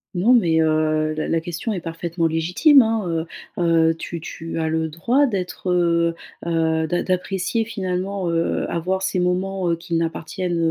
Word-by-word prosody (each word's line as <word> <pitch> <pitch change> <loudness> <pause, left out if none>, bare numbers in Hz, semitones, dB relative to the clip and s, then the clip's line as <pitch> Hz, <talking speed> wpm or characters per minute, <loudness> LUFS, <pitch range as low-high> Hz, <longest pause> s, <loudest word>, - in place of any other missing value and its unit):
Non, 200 +8 +4
mais 170 -9 +4
heu, 155 -1 +2
la 155 0 -3
la 165 - +1
question 175 +7 -4
est 190 -4 -3
parfaitement 165 +1 -3
légitime, 180 - +5
hein, 195 -8 -1 0.3
heu, - - +1 0.3
heu, - - +2
tu 165 +1 -6
tu 165 +1 -7
as 160 -1 0
le 160 0 0
droit 240 - +2
d'être, 190 -5 -4
heu 170 -1 +2 0.3
heu, 160 -1 +1
d'a 175 +2 0
d'apprécier 190 +4 -1
finalement, 195 -3 -3
heu, 165 0 0
avoir 185 +3 -1
ces 190 -1 0
moments, 180 +1 0
heu, 170 - +2
qui 170 +1 -8
n'appartiennent, 170 +2 -2
175 Hz, 170 wpm, -22 LUFS, 165-190 Hz, 0.3 s, légitime